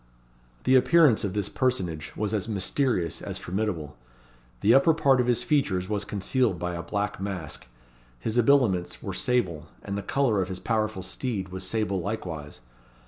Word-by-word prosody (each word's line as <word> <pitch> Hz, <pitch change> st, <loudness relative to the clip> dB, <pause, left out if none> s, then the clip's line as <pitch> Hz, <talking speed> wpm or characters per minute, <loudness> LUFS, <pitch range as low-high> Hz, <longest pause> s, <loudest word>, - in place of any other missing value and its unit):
The 130 Hz, -, +4 dB
appearance 150 Hz, -2 st, +5 dB
of 100 Hz, -3 st, -2 dB
this 105 Hz, -2 st, 0 dB
personage 90 Hz, -, -1 dB
was 105 Hz, 0 st, -2 dB
as 105 Hz, -2 st, -1 dB
mysterious 105 Hz, -, 0 dB
as -, -, -5 dB
formidable. 90 Hz, -6 st, -3 dB, 0.7 s
The 110 Hz, -, +5 dB
upper 155 Hz, +4 st, +5 dB
part 135 Hz, -5 st, +4 dB
of 125 Hz, -, -1 dB
his 120 Hz, -2 st, +2 dB
features 100 Hz, -12 st, +1 dB
was 105 Hz, 0 st, -2 dB
concealed 105 Hz, 0 st, 0 dB
by 90 Hz, +1 st, -3 dB
a 85 Hz, -, -4 dB
black 100 Hz, +3 st, -3 dB
mask. 95 Hz, -10 st, -5 dB, 0.5 s
His 110 Hz, -, -3 dB
habiliments 120 Hz, -8 st, +2 dB
were -, -, -4 dB
sable; 95 Hz, -12 st, 0 dB, 0.2 s
and 100 Hz, -, -4 dB
the 100 Hz, -, -2 dB
colour 120 Hz, -4 st, +1 dB
of 95 Hz, -, -3 dB
his 95 Hz, -1 st, -4 dB
powerful 110 Hz, -4 st, -1 dB
steed 100 Hz, -2 st, -3 dB
was 95 Hz, +1 st, -6 dB
sable 100 Hz, -3 st, -1 dB
likewise. 80 Hz, -, -5 dB
105 Hz, 165 wpm, -26 LUFS, 90-125 Hz, 0.7 s, appearance